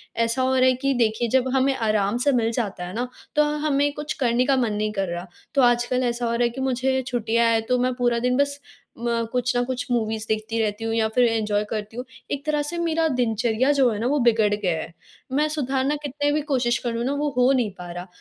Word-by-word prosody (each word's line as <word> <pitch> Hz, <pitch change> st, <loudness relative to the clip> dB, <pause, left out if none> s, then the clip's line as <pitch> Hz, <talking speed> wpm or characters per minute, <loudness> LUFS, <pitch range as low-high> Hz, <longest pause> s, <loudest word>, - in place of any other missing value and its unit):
ऐसा 230 Hz, +2 st, 0 dB
हो 260 Hz, 0 st, +2 dB
रहा 255 Hz, -, +4 dB
है 255 Hz, -, +5 dB
कि, 275 Hz, +2 st, 0 dB
देखिए 235 Hz, -1 st, +1 dB
जब 260 Hz, +1 st, +2 dB
हमें 270 Hz, +1 st, +2 dB
आराम 215 Hz, -2 st, +1 dB
से 285 Hz, +3 st, +2 dB
मिल 230 Hz, -2 st, +1 dB
जाता 205 Hz, -6 st, -3 dB
है 180 Hz, -, -7 dB
ना 245 Hz, +4 st, -2 dB, 0.3 s
तो 300 Hz, -, +5 dB, 0.2 s
हमें 285 Hz, -1 st, +2 dB
कुछ 295 Hz, +1 st, -4 dB
करने 240 Hz, +1 st, +2 dB
का 275 Hz, -1 st, +3 dB
मन 235 Hz, -5 st, +1 dB
नहीं 210 Hz, 0 st, -1 dB
कर 195 Hz, -2 st, -1 dB
रहा। 175 Hz, +2 st, -5 dB, 0.3 s
तो 275 Hz, -, +5 dB
आजकल 240 Hz, +1 st, +2 dB
ऐसा 240 Hz, 0 st, -1 dB
हो 230 Hz, -, 0 dB
रहा 235 Hz, +1 st, +1 dB
है 240 Hz, -, +3 dB
कि 265 Hz, +3 st, -7 dB
मुझे 260 Hz, 0 st, 0 dB
छुट्टियाँ 230 Hz, -1 st, +1 dB
हैं 225 Hz, -, +2 dB
तो 250 Hz, +2 st, +1 dB
मैं 255 Hz, +1 st, +1 dB
पूरा 240 Hz, -1 st, +1 dB
दिन 250 Hz, +1 st, +1 dB
बस 285 Hz, 0 st, 0 dB, 0.4 s
म 235 Hz, -1 st, -1 dB
कुछ 250 Hz, 0 st, 0 dB
न 245 Hz, -, +2 dB
कुछ 255 Hz, 0 st, -3 dB
मूवीज़ 220 Hz, -2 st, -1 dB
देखती 220 Hz, +1 st, -1 dB
रहती 215 Hz, 0 st, -2 dB
हूँ 225 Hz, -, -1 dB
या 225 Hz, -1 st, +2 dB
फ़िर 250 Hz, -, +5 dB
एन्जॉय 210 Hz, -2 st, 0 dB
करती 215 Hz, +1 st, -5 dB
हूँ। 250 Hz, -, -3 dB, 0.3 s
एक 285 Hz, +1 st, -3 dB
तरह 300 Hz, -1 st, +1 dB
से 345 Hz, +4 st, -4 dB
मेरा 330 Hz, -1 st, +1 dB
दिनचर्या 240 Hz, -1 st, +1 dB
जो 270 Hz, -3 st, +4 dB
है 210 Hz, -, -3 dB
ना 235 Hz, -, 0 dB
वो 285 Hz, +2 st, +1 dB
बिगड़ 220 Hz, -2 st, +3 dB
गया 205 Hz, -3 st, 0 dB
है। 165 Hz, -, -9 dB, 0.4 s
मैं 295 Hz, +3 st, +2 dB
सुधारना 275 Hz, -1 st, 0 dB
कितने 290 Hz, +1 st, -1 dB
भी 300 Hz, +1 st, +1 dB
कोशिश 245 Hz, -2 st, +2 dB
करूँ 235 Hz, -1 st, -2 dB
ना, 275 Hz, -, 0 dB
वो 295 Hz, +1 st, -1 dB
हो 250 Hz, +2 st, +5 dB
नहीं 240 Hz, -6 st, +1 dB
पा 175 Hz, 0 st, -7 dB
रहा। 175 Hz, +1 st, -7 dB
245 Hz, 245 wpm, -23 LUFS, 225-265 Hz, 0.4 s, है